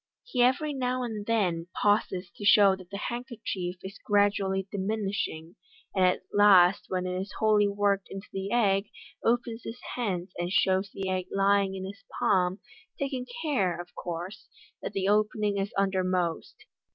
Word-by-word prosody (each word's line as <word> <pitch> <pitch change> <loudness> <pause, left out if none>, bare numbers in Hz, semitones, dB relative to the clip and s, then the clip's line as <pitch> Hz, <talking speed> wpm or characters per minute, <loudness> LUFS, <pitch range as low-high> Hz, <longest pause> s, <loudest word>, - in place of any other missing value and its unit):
He - - -1
every 275 +5 +3
now 255 -1 -1
and 215 -4 -5
t - - 0
win 175 -7 +1
pauses 195 -3 +1
to - - -9
show 200 -1 +6
that 185 -2 -14
the 200 - -5
handkerchief 230 -6 -4
is 195 +2 -8
gradually 200 -2 +2
diminishing, 195 -5 -3 0.4
an 190 - 0
1 - - +6
at 180 0 +2
last 195 -2 +6
when 185 -1 -1
it 185 0 -2
is 195 - -8
wholly 210 -1 +4
worked 200 -1 +1
into 195 +1 -8
the 195 0 -3
egqj, 200 -4 +2 0.3
opens 235 0 0
his 230 +2 -7 0.2
hands, 195 -7 -2
and 175 +1 -2
shows 190 +1 +2
the 195 -1 -4
egg 185 -1 -1
lying 195 0 +2
in 190 0 -5
his 200 +1 -9
palm, 185 0 +2 0.4
taking 265 -2 -3 0.2
care, 195 - 0
of 175 0 -9
course, 175 +3 -6 0.3
that - - -5
the 195 -1 -1
opening 210 0 +1
is 195 +1 -2
undermost. 185 - 0
195 Hz, 165 wpm, -28 LUFS, 185-215 Hz, 0.4 s, show